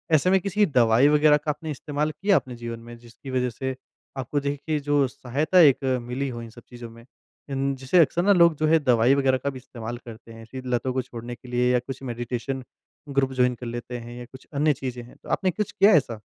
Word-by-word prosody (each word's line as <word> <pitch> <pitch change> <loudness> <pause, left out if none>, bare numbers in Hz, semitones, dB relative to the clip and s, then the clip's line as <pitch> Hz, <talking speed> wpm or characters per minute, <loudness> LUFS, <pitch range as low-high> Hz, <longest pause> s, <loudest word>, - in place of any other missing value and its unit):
ऐसे 155 +4 +3
में 190 - +5
किसी 200 +3 +1
दवाई 125 - +4
वग़ैरह 150 0 +5
का 150 +1 -6
आपने 155 +1 -6
इस्तेमाल 150 +1 -2
किया 195 +7 +1
अपने 130 -7 -1
जीवन 115 -1 -6
में 120 +1 -11
जिसकी 120 +3 -13
वज़ह 125 -1 0
से 130 +3 -4 0.4
आपको 135 +3 -2
देखिए 145 +2 -2
जो 145 -1 +2
सहायता 140 +8 0
एक 145 -5 +6 0.2
मिली 125 +3 -3
हो 120 -2 -6
इन 115 - -9
सब 120 +2 -14
चीज़ों 120 -1 -9
में 115 +1 -15 0.4
इन 135 0 -1
जिसे 135 +7 +2
अक़्सर 170 +1 +3
ना 200 +1 +5
लोग 170 -3 +5
जो 155 - +1
है 160 +1 +5
दवाई 125 -3 +3
वग़ैरह 135 -2 +2
का 140 - -3
भी 135 - -7
इस्तेमाल 120 -2 -7
करते 115 0 -11
हैं। 115 0 -11
फ़िर 130 -1 -7
लतों 125 +1 0
को 130 - 0
छोड़ने 120 -1 -8
के 125 - -17
लिए 125 0 +2
या 125 - +3
कुछ 135 +2 -8
मेडिटेशन 125 +2 -4 0.5
ग्रुप 135 -1 +1
जॉइन 125 -1 +2
कर 120 - -9
लेते 120 +1 -5
हैं 120 0 -9
या 120 - -8
कुछ 130 +2 -15
अन्य 150 +2 +2
चीज़ें 125 -3 -6
हैं। 120 - -15
तो - - -12
आपने 185 - +1
कुछ 210 +3 -3
किया 205 +1 +5
ऐसा? 125 -8 +2
130 Hz, 235 wpm, -25 LUFS, 120-150 Hz, 0.5 s, एक